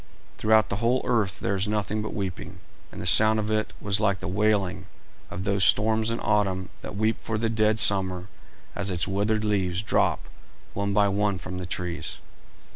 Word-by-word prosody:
Throughout 110 0 +3
the 100 - -2
whole 120 +4 +1
earth 105 -7 0
there 100 - 0
was 95 +1 -1
nothing 105 0 -1
but 110 - -4
weeping, 95 -4 -5 0.3
and - - -10
the - - -5
sound 110 +5 +6
of 105 0 -2
it 110 0 0
was 100 0 0
like 100 -3 +1
the - - -7
wailing 95 -2 0 0.4
of 90 - -5
those 100 -1 +1
storms 110 +2 +3
in 115 - -2
autumn 95 -3 0
that 95 - -7
weep 110 +2 +1
for 110 - -3
the 115 +1 -1
dead 110 -1 +1
summer 95 -3 +2 0.5
as 100 -1 -1
its 90 -1 -1
withered 105 +2 0
leaves 95 -2 0
drop - - +1 0.5
one 100 0 -2
by 100 0 +3
one 100 0 0
from 90 +1 -6
the 90 - -6
trees. 90 -1 -4
100 Hz, 190 wpm, -25 LUFS, 95-110 Hz, 0.5 s, sound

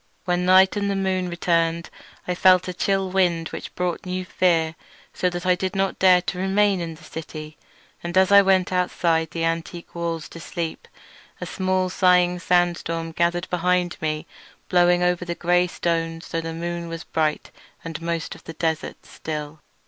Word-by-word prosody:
When 180 -1 0
night 190 +1 +6
and 200 -1 -1
the 200 - 0
moon 190 -2 -1
returned 170 -1 0 0.4
I 180 - 0
felt 185 0 +4
a 180 - -3
chill 195 +1 0
wind 175 -4 +1
which - - -8
brought 180 -1 -2
new 185 0 -4
fear, 165 -3 +1 0.4
so 180 - 0
that 175 0 -5
I 180 - +5
did 185 +1 -3
not 195 0 -1
dare 180 -2 +5
to 180 0 -4
remain 195 0 +2
in 165 -1 -5
the - - -17
city. 155 -1 -8 0.5
And 175 +1 -2
as 190 +1 +4
I 200 0 +9
went 190 -2 +2
outside 170 -3 +1
the 165 +1 -4
antique 165 +1 -4
walls 170 -2 -3
to 170 - -10
sleep, 165 0 -5 0.5
a - - -4
small 185 -1 -1
sighing 180 -1 +3
sandstorm 170 -2 0
gathered 175 +2 0
behind 180 0 +1
me, 155 -1 -2 0.4
blowing 175 0 +4
over 180 0 +1
the 175 -1 -4
grey 175 +1 +2
stones 165 -1 -2
though 165 - -2
the 165 0 -5
moon 170 +1 -4
was 165 0 -6
bright 155 -2 -1 0.3
and 165 -1 -6
most 165 -1 -3
of - - -16
the 165 - -7
desert 160 -1 -3
still. 150 0 -6
175 Hz, 180 wpm, -23 LUFS, 165-185 Hz, 0.5 s, I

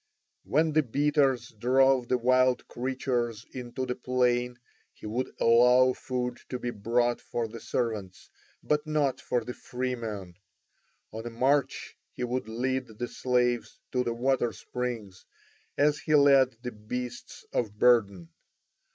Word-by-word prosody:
When 155 +2 +2
the 155 - +5
beaters 140 -2 +1
drove 130 +3 +3
the 125 - +2
wild 130 +1 +2
creatures 120 -3 -2
into 125 0 -5
the 125 - -2
plain 125 -1 0 0.4
he - - -13
would 120 +5 -2
allow 125 +2 +5
food 125 -1 -4
to 125 - -3
be 120 -1 -3
brought 120 +3 0
for 115 -1 -3
the 115 +1 -9
servants, 105 -8 -4 0.3
but 150 +1 0
not 150 -4 0
for 120 - -1
the 125 - -6
free 125 +1 -4
men; 105 -7 -6 0.8
on 110 +2 -6
a - - -3
march 135 +4 0 0.2
he - - -5
would 125 -2 -2
lead 130 +3 -1
the 120 - -3
slaves 125 -1 0
to 125 -1 +1
the 120 -1 -2
water 125 -1 +1
springs 115 -6 -5 0.5
as 150 +1 +3
he 155 - +1
led 135 -4 +5
the 125 - -4
beasts 120 +3 -7
of 105 -3 -1
burden. 100 -8 +3
125 Hz, 140 wpm, -28 LUFS, 115-130 Hz, 0.8 s, the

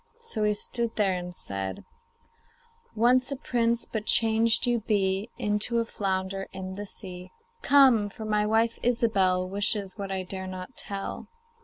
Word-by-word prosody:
So 235 - -2
he 210 0 +2
stood 235 +2 -2
there 200 -3 +2
and 180 -1 -4
said: 95 - -5 1.1
'Once 250 +4 +3
a - - -1
prince, 235 -3 0
but 220 -1 -5
changed 225 0 +3
you 240 -1 +2
be 200 -1 0
Into 210 +3 0
a 230 - +1
flounder 195 -2 -2
in 190 0 -6
the 205 +2 -6
sea. 185 -3 -7 0.3
Come! 260 - +5
for 220 +2 -8
my 210 -1 +1
wife, 225 +1 +2
Ilsebel, 195 -7 +2
Wishes 200 +1 -1
what 195 -1 -4
I 190 -1 -2
dare 190 0 -5
not 185 +6 -7
tell. 195 -1 -5
210 Hz, 155 wpm, -27 LUFS, 190-230 Hz, 1.1 s, Come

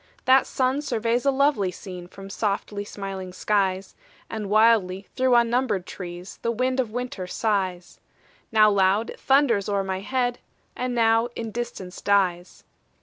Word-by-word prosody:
That 260 +1 +5
sun 260 +2 0
surveys 235 -2 -1
a - - +5
lovely 275 -8 +2
scene 180 -1 -9
From 195 +2 -11
softly 205 0 -2
smiling 195 -2 -6
skies; 190 -1 0 0.4
And 215 -3 -4
wildly 210 -3 +3
through 255 -1 +3
unnumbered 235 -5 +2
trees 180 0 -8
The 230 - -1
wind 255 +3 0
of 245 -4 0
winter 235 -5 -5
sighs: 185 -4 -2 0.5
Now 215 -1 +6
loud, 200 +3 +2
it - - -12
thunders 265 -8 +3
o'er 200 -1 +1
my 190 -1 -3
head, 245 +3 -1 0.4
And 250 0 -2
now 225 0 +3
in 225 -1 -5
distance 230 -6 -6
dies. 185 -3 0
215 Hz, 145 wpm, -24 LUFS, 190-245 Hz, 0.5 s, Now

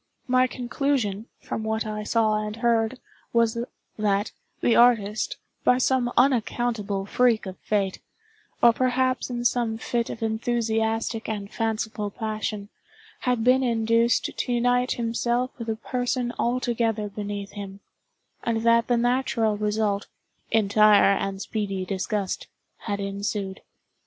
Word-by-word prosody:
My 255 0 +4
conclusion, 245 -4 -1
from - - -4
what 220 0 -1
I 215 0 -3
saw 215 -1 +1
and 210 0 -4
heard, 230 +1 +1 0.3
was, 230 -1 +3 0.4
that, 205 -1 +1 0.3
the 235 - +3
artist, 220 -3 +3 0.3
by 250 - +4
some 255 -1 +1
unaccountable 230 -5 +1
freak 235 +1 +2
of 190 -1 -6
fate, 200 -3 -1 0.6
or 235 -1 +8
perhaps 255 +1 +1
in 240 -1 -3
some 235 -2 +1
fit 235 +1 -2
of 225 - -5
enthusiastic 225 0 -1
and 205 -2 -4
fanciful 220 -2 -2
passion, 215 -1 -4 0.6
had 245 -3 +1
been 255 +2 +5
induced 230 -1 +2
to - - -2
unite 245 +1 +2
himself 240 +2 -1
with 230 -1 -5
a 220 - 0
person 245 +1 -2
altogether 235 -3 0
beneath 205 0 -5
him, 200 -1 -8 0.6
and 225 -1 0
that 230 0 +4
the 245 - +2
natural 235 -3 +1
result, 210 -1 0 0.4
entire 210 -1 +5
and 195 0 -3
speedy 195 -4 -3
disgust, 195 +1 -2 0.4
had 205 -2 -2
ensued. 200 0 -3
225 Hz, 125 wpm, -25 LUFS, 210-240 Hz, 0.6 s, or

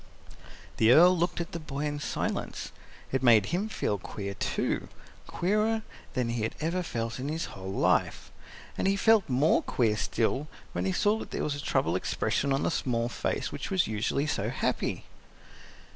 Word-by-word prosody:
The 110 +1 +5
Earl 175 +7 +8
looked 175 +1 0
at 170 - -4
the 170 - -4
boy 145 -2 -4
in 145 0 -2
silence. - - -3 0.4
It 130 - 0
made 115 -5 +6
him 200 +5 0
feel 105 - -1
queer, 100 +1 -5
too 100 - -1 0.4
queerer 215 +4 +1 0.3
than 125 -3 0
he 115 -1 -1
had 110 - -2
ever 170 +4 0
felt 115 -7 -3
in 135 +3 -3
his 160 +3 -2
whole 95 -1 -6
life. - - +1 0.5
And - - +1
he 195 - +3
felt 220 -3 +4
more 135 +5 +3
queer 115 -4 +1
still 120 +6 0 0.2
when 90 +1 -2
he 95 - +1
saw 210 - +2
that - - -7
there - - -3
was 150 - 0
a 145 - -5
troubled 85 -7 +1
expression 140 +8 -1
on 135 - +1
the - - +1
small 120 -2 0
face - - -2
which - - -5
was 190 -3 +2
usually 110 +6 -1
so 155 - -1
happy. - - -1
140 Hz, 180 wpm, -29 LUFS, 115-175 Hz, 0.5 s, Earl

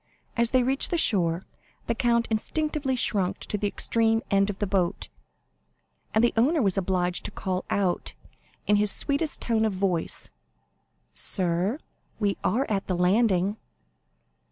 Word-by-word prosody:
As 235 -1 +2
they 255 0 +3
reached 265 +2 +4
the 345 - 0
shore, 180 - +1 0.4
the - - 0
count 235 -1 +1
instinctively 290 +4 -1
shrunk 200 -5 0
to - - -3
the 205 0 -1
extreme 225 +2 +1
end 195 0 +3
of 200 - -4
the 205 - -1
boat, 190 -1 0 1.0
and 220 - +2
the 240 - +3
owner 280 +9 +3
was 195 -8 +2
obliged 180 -2 0
to - - -1
call 185 -1 -3
out, 190 -3 -1 0.5
in 205 - +3
his 210 -1 +4
sweetest 290 +2 +1
tone 225 -2 +1
of 220 -2 +1
voice: 185 -3 -1 0.8
"Sir, 185 +5 +1 0.4
we 205 -2 +1
are 260 +5 +1
at 200 -2 -2
the 185 - 0
landing." 195 +1 +2
210 Hz, 150 wpm, -26 LUFS, 190-235 Hz, 1.0 s, reached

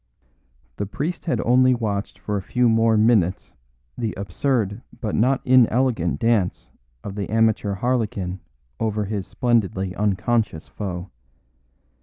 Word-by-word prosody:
The 100 - -3
priest 150 - -4
had 165 - 0
only 130 +1 +4
watched 105 -4 -3
for 105 - -4
a 100 - -1
few 125 +6 +1
more 115 -1 +3
minutes 105 -5 +2 0.4
the 115 -3 -3
absurd 105 +2 -1 0.2
but 110 -4 -3
not 130 +4 +2
inelegant 125 -7 +3
dance 115 -6 0 0.3
of 100 - -6
the 100 -1 -4
amateur 110 -2 +2
harlequin 105 -5 -1 0.4
over 110 -1 -1
his 100 -2 -4
splendidly 105 -6 0
unconscious 105 -3 0
foe. 95 -2 -6
110 Hz, 125 wpm, -23 LUFS, 100-120 Hz, 0.4 s, only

